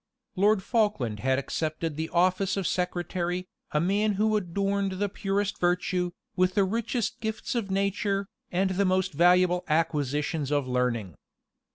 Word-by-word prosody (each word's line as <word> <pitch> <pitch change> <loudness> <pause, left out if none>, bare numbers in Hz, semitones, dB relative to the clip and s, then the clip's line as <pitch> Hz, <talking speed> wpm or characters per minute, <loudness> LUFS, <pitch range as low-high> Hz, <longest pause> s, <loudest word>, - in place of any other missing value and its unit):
Lord 200 +1 +3
Falkland 205 - 0
had 130 +3 +1
accepted 155 +3 -2
the 160 +2 -3
office 185 +3 +2
of 195 - -1
secretary; 180 0 -1 0.2
a 150 - +1
man 205 +5 +2
who 215 +2 +2
adorned 195 +1 0
the 200 +2 -1
purest 200 0 -2
virtue, 180 0 +1 0.3
with 185 0 +2
the 200 - +4
richest 225 +2 -1
gifts 220 -1 -3
of 230 -5 -2
nature, 200 0 0 0.2
and 190 +2 +1
the 195 +2 +1
most 185 -1 +1
valuable 180 +2 +4
acquisitions 150 -2 0
of 145 -3 +1
learning. 125 -7 -1
185 Hz, 145 wpm, -27 LUFS, 165-200 Hz, 0.3 s, the